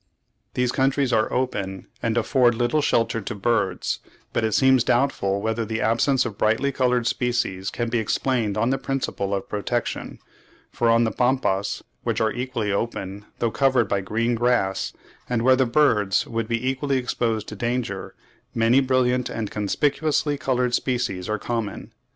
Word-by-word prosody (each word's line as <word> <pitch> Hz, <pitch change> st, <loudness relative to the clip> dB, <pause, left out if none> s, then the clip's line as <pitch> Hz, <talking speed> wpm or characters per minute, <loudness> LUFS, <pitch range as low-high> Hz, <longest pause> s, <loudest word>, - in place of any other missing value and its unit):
These 125 Hz, -1 st, +1 dB
countries 135 Hz, -1 st, +1 dB
are 110 Hz, -1 st, +2 dB
open, 100 Hz, -7 st, -2 dB, 0.2 s
and 115 Hz, 0 st, 0 dB
afford 120 Hz, 0 st, +3 dB
little 120 Hz, +6 st, +1 dB
shelter 115 Hz, -4 st, +1 dB
to 100 Hz, -, -5 dB
birds; 100 Hz, -3 st, 0 dB, 0.3 s
but -, -, 0 dB
it 110 Hz, -1 st, 0 dB
seems 130 Hz, +1 st, +5 dB
doubtful 120 Hz, -7 st, +1 dB
whether 110 Hz, +1 st, 0 dB
the 110 Hz, 0 st, -3 dB
absence 125 Hz, +4 st, +2 dB
of 100 Hz, -, -6 dB
brightly 115 Hz, +6 st, +2 dB
coloured 125 Hz, -2 st, +1 dB
species 120 Hz, -6 st, -1 dB
can 120 Hz, -, -3 dB
be 115 Hz, 0 st, 0 dB
explained 110 Hz, -1 st, 0 dB
on 115 Hz, +4 st, +2 dB
the 135 Hz, -, 0 dB
principle 130 Hz, -7 st, -2 dB
of 100 Hz, -1 st, -2 dB
protection, 115 Hz, +3 st, -3 dB, 0.5 s
for 120 Hz, -, +1 dB
on 115 Hz, +1 st, +5 dB
the 110 Hz, -, +1 dB
Pampas, 125 Hz, -6 st, 0 dB, 0.2 s
which -, -, -1 dB
are 110 Hz, 0 st, +2 dB
equally 120 Hz, -4 st, -2 dB
open, 100 Hz, -1 st, -3 dB
though 115 Hz, -1 st, 0 dB
covered 130 Hz, -3 st, +2 dB
by 100 Hz, -1 st, 0 dB
green 115 Hz, +5 st, 0 dB
grass, 110 Hz, -, +1 dB, 0.4 s
and 120 Hz, -2 st, 0 dB
where 130 Hz, +1 st, +6 dB
the 130 Hz, -1 st, +2 dB
birds 115 Hz, -7 st, +3 dB
would 115 Hz, -1 st, -3 dB
be 115 Hz, +2 st, -1 dB
equally 135 Hz, +1 st, 0 dB
exposed 115 Hz, -3 st, -1 dB
to 105 Hz, -, -7 dB
danger, 120 Hz, -3 st, -3 dB, 0.4 s
many 115 Hz, +3 st, +4 dB
brilliant 125 Hz, -2 st, +1 dB
and 110 Hz, -3 st, -4 dB
conspicuously 145 Hz, +8 st, 0 dB
coloured 125 Hz, -2 st, 0 dB
species 120 Hz, -9 st, -1 dB
are 105 Hz, -, 0 dB
common. 115 Hz, -2 st, -4 dB
120 Hz, 165 wpm, -24 LUFS, 105-130 Hz, 0.5 s, where